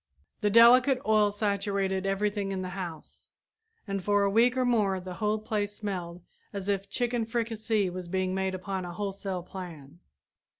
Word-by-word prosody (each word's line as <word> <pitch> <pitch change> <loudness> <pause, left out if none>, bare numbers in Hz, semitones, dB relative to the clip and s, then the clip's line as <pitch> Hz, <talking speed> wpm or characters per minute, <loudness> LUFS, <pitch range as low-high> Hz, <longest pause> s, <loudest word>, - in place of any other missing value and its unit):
The 210 - +1
delicate 250 +4 +7
oil 215 -1 +4
saturated 200 -2 -1
everything 200 0 -1
in 190 -1 -3
the 185 - -4
house, 180 -4 -8 0.6
and 195 -1 -3
for 205 +1 +3
a 200 - +2
week 240 +4 +4
or 255 - +2
more 210 -6 +2
the 180 0 -7
whole 210 0 +2
place 210 -1 -2
smelled 180 -5 -5 0.3
as 200 -2 -5
if 195 0 -1
chicken 240 +1 0
fricassee 225 -2 -1
was 180 0 -6
being 185 +1 -1
made 190 0 -1
upon 190 0 -4
a 175 -1 -6
wholesale 195 -1 -4
plan. 170 -5 -9
200 Hz, 165 wpm, -28 LUFS, 185-215 Hz, 0.6 s, delicate